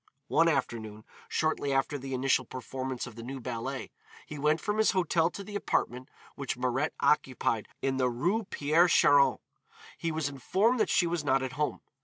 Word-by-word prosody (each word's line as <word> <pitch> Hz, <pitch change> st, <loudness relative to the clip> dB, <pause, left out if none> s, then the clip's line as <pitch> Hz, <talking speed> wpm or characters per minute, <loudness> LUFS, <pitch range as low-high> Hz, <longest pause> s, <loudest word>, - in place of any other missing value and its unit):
One 165 Hz, -, +4 dB
afternoon, 110 Hz, -8 st, -2 dB, 0.2 s
shortly 155 Hz, -3 st, 0 dB
after 135 Hz, +1 st, 0 dB
the 135 Hz, 0 st, -4 dB
initial 130 Hz, 0 st, +2 dB
performance 130 Hz, +1 st, -5 dB
of 125 Hz, -, -9 dB
the 115 Hz, -, -8 dB
new 130 Hz, +3 st, -6 dB
ballet, 125 Hz, +2 st, -5 dB, 0.3 s
he 150 Hz, -, -8 dB
went 150 Hz, +2 st, +2 dB
from 210 Hz, 0 st, -2 dB
his 220 Hz, -, +4 dB
hotel 170 Hz, -3 st, +2 dB
to 200 Hz, -, -8 dB
the 205 Hz, +1 st, -9 dB
apartment 125 Hz, -9 st, -1 dB, 0.2 s
which 140 Hz, -3 st, -4 dB
Mirette 130 Hz, +4 st, -1 dB
occupied 125 Hz, -6 st, +1 dB, 0.2 s
in 135 Hz, -1 st, 0 dB
the 130 Hz, -1 st, +2 dB
Rue 180 Hz, -, 0 dB
Pierre 160 Hz, +2 st, +3 dB
Charon. 145 Hz, -4 st, +5 dB, 0.6 s
He 165 Hz, -, -1 dB
was 155 Hz, -2 st, -1 dB
informed 190 Hz, -, +1 dB
that -, -, +2 dB
she 180 Hz, -, +3 dB
was 170 Hz, -2 st, -1 dB
not 135 Hz, -2 st, +2 dB
at 130 Hz, -, -3 dB
home. 150 Hz, +3 st, -2 dB
140 Hz, 180 wpm, -29 LUFS, 130-165 Hz, 0.6 s, Charon